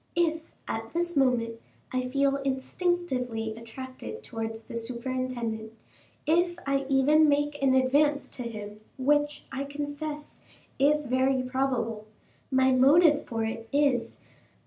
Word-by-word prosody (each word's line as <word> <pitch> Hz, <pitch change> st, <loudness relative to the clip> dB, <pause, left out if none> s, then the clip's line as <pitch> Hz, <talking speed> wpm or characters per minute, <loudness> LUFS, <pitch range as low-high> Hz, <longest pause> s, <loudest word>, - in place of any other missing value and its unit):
If, 330 Hz, -1 st, +2 dB, 0.3 s
at 225 Hz, 0 st, -4 dB
this 345 Hz, 0 st, 0 dB
moment, 240 Hz, -4 st, +2 dB, 0.3 s
I 255 Hz, -, +1 dB
feel 275 Hz, +2 st, +1 dB
instinctively 265 Hz, -4 st, -1 dB
attracted 260 Hz, -, -8 dB
towards 225 Hz, -1 st, -5 dB
the -, -, -9 dB
superintendent, 235 Hz, -2 st, -3 dB, 0.5 s
if 345 Hz, +3 st, +2 dB
I 275 Hz, -1 st, 0 dB
even 295 Hz, +3 st, +5 dB
make 290 Hz, 0 st, +1 dB
an 265 Hz, -1 st, +4 dB
advance 285 Hz, +3 st, +3 dB
to 255 Hz, -, -6 dB
him, 210 Hz, -3 st, -6 dB, 0.2 s
which, 290 Hz, +2 st, +1 dB
I 275 Hz, -, -3 dB
confess, 295 Hz, +1 st, -5 dB, 0.4 s
is 295 Hz, +2 st, +3 dB
very 260 Hz, +1 st, +2 dB
probable, 250 Hz, -4 st, -1 dB, 0.4 s
my 260 Hz, -1 st, +4 dB
motive 295 Hz, +4 st, +5 dB
for 225 Hz, -1 st, -2 dB
it 225 Hz, 0 st, -5 dB
is, 275 Hz, -5 st, +2 dB
that -, -, -31 dB
M. -, -, -29 dB
265 Hz, 130 wpm, -28 LUFS, 235-290 Hz, 0.5 s, even